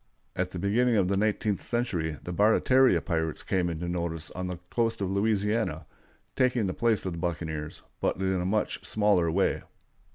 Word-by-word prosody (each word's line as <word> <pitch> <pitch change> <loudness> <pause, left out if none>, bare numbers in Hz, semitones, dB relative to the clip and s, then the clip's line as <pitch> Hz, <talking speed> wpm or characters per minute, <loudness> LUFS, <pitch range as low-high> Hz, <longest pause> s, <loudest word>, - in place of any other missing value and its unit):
At 90 0 -1
the 90 - -7
beginning 115 +6 +2
of 95 -4 +2
the 100 - +2
nineteenth 105 0 0
century 90 -11 -1
the 90 - -5
Barataria 125 +6 +4
pirates 80 -3 -2
came 90 -2 0
into 85 +1 -4
notice 85 -2 -2
on 90 0 -4
the 90 -1 -4
coast 115 -1 0
of 95 -2 -1
Louisiana, 105 -4 0 0.5
taking 125 -4 +2
the 95 - -1
place 115 -2 +1
of 95 - -2
the 85 - -6
buccaneers, 80 -3 -4 0.2
but - - 0
in 95 -1 0
a - - -2
much 105 +4 -1
smaller 105 -6 +2
way. 95 +4 +1
95 Hz, 175 wpm, -28 LUFS, 85-110 Hz, 0.5 s, Barataria